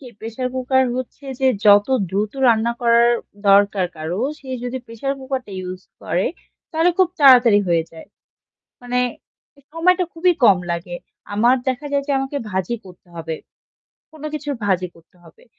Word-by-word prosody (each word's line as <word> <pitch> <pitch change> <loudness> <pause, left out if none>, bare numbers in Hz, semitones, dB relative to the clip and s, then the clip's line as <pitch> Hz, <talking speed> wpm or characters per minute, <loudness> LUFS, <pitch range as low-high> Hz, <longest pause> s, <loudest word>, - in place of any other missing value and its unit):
কি 270 - -12
pressure 230 +3 -4
cooker 260 +1 +2
হচ্ছে 255 +2 -7 0.2
যে 265 - +3 0.2
যত 205 0 +7 0.2
দ্রুত 205 +2 -1
রান্না 230 0 +3
করার 235 0 +4 0.4
দরকার 200 -1 +4
কারো, 160 +5 -4 0.2
সে 270 - -15 0.2
যদি 255 +1 -3
প্রেশার 230 +4 -3
কুকারটা 260 -4 -5
ইউজ 185 0 -7 0.2
করে 175 +3 0 0.4
তাহলে 330 +2 +2
খুব 375 -2 +4
তাড়াতাড়ি 245 -6 +7
হয়ে 170 -1 +2
যায়। 160 - -12 0.8
মানে 245 0 -1 0.6
এ - - -22
সময়টা 365 +3 +3
খুবই 355 +2 +3
কম 200 -5 +7
লাগে। 170 +1 -4 0.4
আমার 235 +5 +4
দেখা 260 +3 -2
যায় 280 0 +1
যে - - 0
আমাকে 270 +2 -3
ভাজি 190 +4 -2
করতে 180 0 -16
হবে 165 -1 -4 0.8
কোন 310 -1 -14
কিছুর 290 -2 -3
ভাজি 185 -2 +1
করতে 165 +2 -23
হবে। 165 -2 -19
235 Hz, 160 wpm, -20 LUFS, 190-270 Hz, 0.8 s, যত